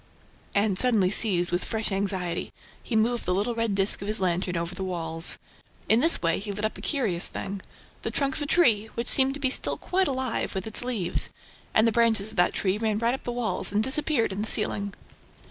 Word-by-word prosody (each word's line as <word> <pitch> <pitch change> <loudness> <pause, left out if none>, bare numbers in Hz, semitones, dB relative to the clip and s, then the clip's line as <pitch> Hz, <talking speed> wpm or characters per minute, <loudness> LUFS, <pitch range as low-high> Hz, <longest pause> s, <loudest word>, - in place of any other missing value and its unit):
And, 200 -2 +2
suddenly 215 -7 +3
seized 180 -6 +2
with 175 +1 0
fresh 220 -1 -1
anxiety, 190 -3 -1 0.3
he 235 - -4
moved 235 +2 +1
the 180 - 0
little 210 +5 0
red 230 -3 -1
disk 195 0 +2
of 200 - -5
his 215 +1 -2
lantern 180 -1 0
over 170 +1 -3
the 190 - -5
walls. 165 -3 0 0.5
In 220 - +4
this 325 - +3
way, 165 0 +2
he 205 +1 -5
lit 205 +2 -3
up 215 - -2
a - - -10
curious 220 - -1
thing: 195 0 -5 0.4
the - - -3
trunk 275 -2 -1
of - - -3
a 290 - -2
tree, 230 -11 +3
which 235 - -2
seemed 270 +1 +4 0.2
still - - 0
quite 375 0 0
alive, 260 -6 -2
with 190 - -3
its 220 +2 -2
leaves; 230 -8 0 0.4
and 220 - +4
the - - +3
branches 220 -2 +2
of - - -13
that 175 - +4
tree 195 +1 0
ran 220 -2 0
right 235 +2 +1
up 265 - -6
the 245 - -2
walls 240 -5 -2
and 210 +1 +1
disappeared 270 -2 +1
in 195 +2 -3
the 215 - -1
ceiling. 200 -2 +1
215 Hz, 215 wpm, -26 LUFS, 190-240 Hz, 0.5 s, In